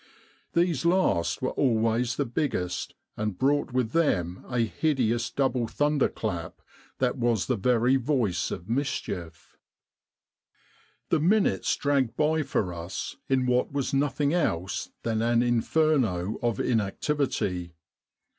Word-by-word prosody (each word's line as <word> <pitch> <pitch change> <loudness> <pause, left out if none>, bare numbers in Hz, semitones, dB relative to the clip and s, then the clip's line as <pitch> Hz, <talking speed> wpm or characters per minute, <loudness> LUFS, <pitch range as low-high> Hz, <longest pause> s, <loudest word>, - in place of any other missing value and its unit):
These 170 -5 +1
last 170 - +1
were - - 0
always 115 -1 +1
the - - 0
biggest, 115 - -2 0.2
and 105 -3 -3
brought 145 +3 +1
with 125 -3 0
them 95 - 0
a 125 -2 +1
hideous 120 -2 0
double 130 -4 0
thunder 145 +4 +1
clap 90 -7 -4 0.4
that 125 0 0
was 120 -4 +1
the 130 - 0
very 125 +4 +3
voice 125 - 0
of 85 - -6
mischief. 100 - -4 1.5
"The 165 - +3
minutes 195 +7 +2
dragged 135 -5 0
by 155 +1 +2
for 110 -10 -1
us 85 +2 -5
in 130 -1 +2
what 125 0 +1
was 140 -1 -2
nothing 140 +1 +1
else 95 - -1
than 110 -1 0
an 120 +1 +3
Inferno 120 - +1
of 120 -4 0
inactivity. 105 - -1
125 Hz, 125 wpm, -27 LUFS, 110-145 Hz, 1.5 s, very